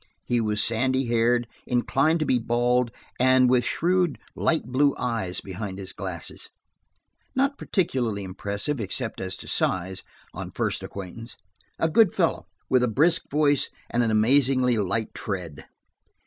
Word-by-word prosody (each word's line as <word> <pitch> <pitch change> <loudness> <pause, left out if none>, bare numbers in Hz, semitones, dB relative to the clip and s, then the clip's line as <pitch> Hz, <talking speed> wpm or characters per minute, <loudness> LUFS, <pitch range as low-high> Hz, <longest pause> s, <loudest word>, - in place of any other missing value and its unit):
He 120 -1 +1
was 105 -1 +2
sandy 130 +3 +1
haired, 120 +1 +2 0.2
inclined 140 +6 +2
to - - +1
be 125 - +2
bald, 120 +1 +1 0.3
and 130 0 +5
with 125 0 +3
shrewd, 175 +2 +1 0.2
light 160 - +1
blue 135 +3 +2
eyes 115 -7 -2
behind 95 0 -6
his 95 -1 -7
glasses. 95 -4 -5 0.9
Not 275 +2 +1
particularly 120 - -1
impressive, 100 +8 -3
except 110 +3 -3
as 95 0 -3
to - - -9
size, 95 +1 0 0.3
on - - -6
first - - -2
acquaintance; 100 +4 -8 0.4
a 165 - +2
good 190 +4 +4
fellow, - - 0 0.2
with 130 -1 +3
a 125 - +2
brisk 150 +10 +2
voice, 145 -2 +2 0.2
and 120 - +2
an 115 - +1
amazingly 125 +3 +3
light 110 +1 -1
tread. 90 -7 -5
120 Hz, 145 wpm, -25 LUFS, 105-135 Hz, 0.9 s, and